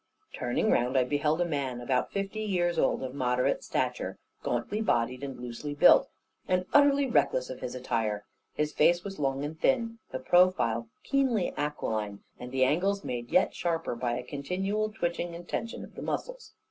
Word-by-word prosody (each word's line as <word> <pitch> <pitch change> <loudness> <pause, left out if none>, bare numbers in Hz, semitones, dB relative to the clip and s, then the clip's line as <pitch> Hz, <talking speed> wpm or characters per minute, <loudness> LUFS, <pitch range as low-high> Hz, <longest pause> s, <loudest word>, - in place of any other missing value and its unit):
Turning 125 -1 0
round, 125 +2 +2
I 130 - +5
beheld 150 +5 +1
a - - +3
man 140 -6 -2
about 125 +1 0
fifty 200 +2 -3
years 175 -5 0
old, - - +2
of 130 -1 -4
moderate 125 -2 +1
stature, - - -2 0.2
gauntly 125 - -1
bodied, 125 - 0
and 135 -3 -5
loosely 125 +4 -5
built, - - +6 0.4
and 185 0 +1
utterly 285 -1 +5
reckless - - +1
of - - -7
his 125 - -5
attire. 115 -5 -1 0.3
His 150 0 -1
face 175 +3 +4
was 195 -3 -7
long 135 -1 0
and 155 +2 -6
thin, 230 -3 +1
the - - -3
profile 130 -6 +3 0.2
keenly 265 -8 +1
aquiline; 110 -9 -3 0.2
and 125 0 -7
the 130 0 +2
angles 195 +9 +1
made 120 -1 -4
yet - - +3
sharper, 165 -4 -1
by 120 0 -1
a 125 - -5
continual 190 +11 -2
twitching 175 -4 -2
and 175 +1 -10
tension 230 +1 -4
of - - -12
the - - -8
muscles. - - -4
150 Hz, 175 wpm, -29 LUFS, 125-195 Hz, 0.4 s, built